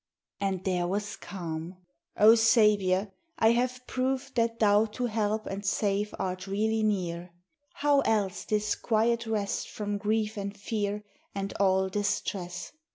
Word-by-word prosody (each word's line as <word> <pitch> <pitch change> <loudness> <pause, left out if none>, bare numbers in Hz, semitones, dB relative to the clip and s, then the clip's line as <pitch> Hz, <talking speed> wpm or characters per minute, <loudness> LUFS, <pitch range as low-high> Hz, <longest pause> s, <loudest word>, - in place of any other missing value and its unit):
And 195 -2 -1
there 180 -2 0
was 205 +3 -2
calm! 170 -1 -6 0.4
O 215 +2 +8
Saviour, 210 -4 +3 0.3
I 225 0 +5
have 250 +1 0
proved 265 +2 -2
That 230 -1 +1
thou 210 0 +4
to 235 +3 -4
help 215 -1 -1
and 195 +1 -5
save 205 +1 0
art 185 +1 -3
really 220 +3 0
near: 180 -5 -1 0.4
How 290 -1 +3
else 210 -7 0
this 210 0 0
quiet 230 +1 +1
rest 210 -3 -2
from 205 -1 -3
grief 215 +1 0
and 200 +1 -5
fear 205 0 -2 0.3
And 195 0 -3
all 190 -1 +3
distress? 190 -3 -2
210 Hz, 140 wpm, -28 LUFS, 195-225 Hz, 0.4 s, O